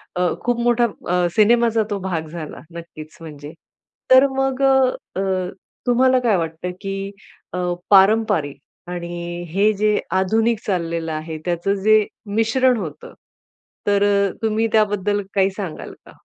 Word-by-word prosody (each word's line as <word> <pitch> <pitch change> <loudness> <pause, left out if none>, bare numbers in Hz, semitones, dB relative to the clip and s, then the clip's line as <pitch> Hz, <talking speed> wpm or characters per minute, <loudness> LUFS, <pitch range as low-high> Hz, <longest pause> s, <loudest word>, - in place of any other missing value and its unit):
अ, 180 0 +1
खूप 245 -1 0
मोठा 240 0 +3 0.2
अ, 180 0 +2
सिनेमाचा 230 +1 +4
तो 205 - -1
भाग 175 -4 -3
झाला 155 -2 -7 0.2
नक्कीच 160 -2 -10
म्हणजे. 150 -1 -9 0.6
तर 260 +2 +8
मग 270 0 0
अ, 265 -6 +1
अ, 190 -1 -1 0.4
तुम्हाला 255 +1 +4
काय 230 -6 +2
वाटतं, 165 +1 -4
की 195 0 -4 0.4
अ, - - -3 0.3
पारंपारिक 195 -7 +4 0.3
आणि 175 0 -5
हे 200 +6 +3
जे 210 +1 +1
आधुनिक 220 +4 +1
चाललेलं 170 -4 -2
आहे 155 +1 -5
त्याचं 175 +3 0
जे 215 0 +5 0.3
मिश्रण 245 +3 +3
होतं. 155 -7 -7 0.7
तर 200 0 +3 0.4
तुम्ही 220 0 +1
त्याबद्दल 205 -2 +1
काही 195 -1 +3
सांगाल 190 -5 -7
का? - - -14
195 Hz, 135 wpm, -20 LUFS, 175-225 Hz, 0.7 s, तर